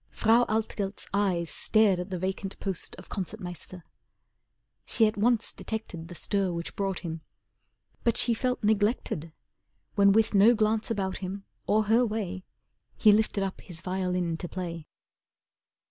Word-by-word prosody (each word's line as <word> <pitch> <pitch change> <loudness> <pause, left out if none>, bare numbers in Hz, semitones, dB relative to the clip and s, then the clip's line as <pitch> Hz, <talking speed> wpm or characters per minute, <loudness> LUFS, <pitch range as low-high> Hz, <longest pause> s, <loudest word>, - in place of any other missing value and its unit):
Frau 230 +2 +4
Altgelt's 210 -2 -2
eyes 185 -5 +1
stared 215 -4 +3
at 180 +2 -4
the 185 - -3
vacant 190 +2 -3
post 190 -4 -2
Of 180 - -12
Concert 190 -4 -5
Meister, 175 0 -8 1.0
she 225 - +3
at 215 - +1
once 230 +2 +1
detected 190 -7 -5
The 175 - -9
stir 195 +2 0
which 170 0 -5
brought 195 -2 -2
him. 165 -2 -5 0.8
But 235 - +2
she 235 - +3
felt 250 +1 -1
neglected 205 - +1 0.6
When 200 -1 +5
with 220 +2 +3
no 210 +4 +6
glance 215 0 +1
about 195 -4 -1
him 195 +1 -6 0.2
or 215 +1 +3
her 225 +4 +4
way, 205 -5 -3 0.5
He 215 - +6
lifted 210 -1 +2
up 190 -1 -4
his 170 -2 -8
violin 180 -2 -1
to 175 - -6
play. 170 -4 -5
195 Hz, 150 wpm, -28 LUFS, 180-215 Hz, 1.0 s, no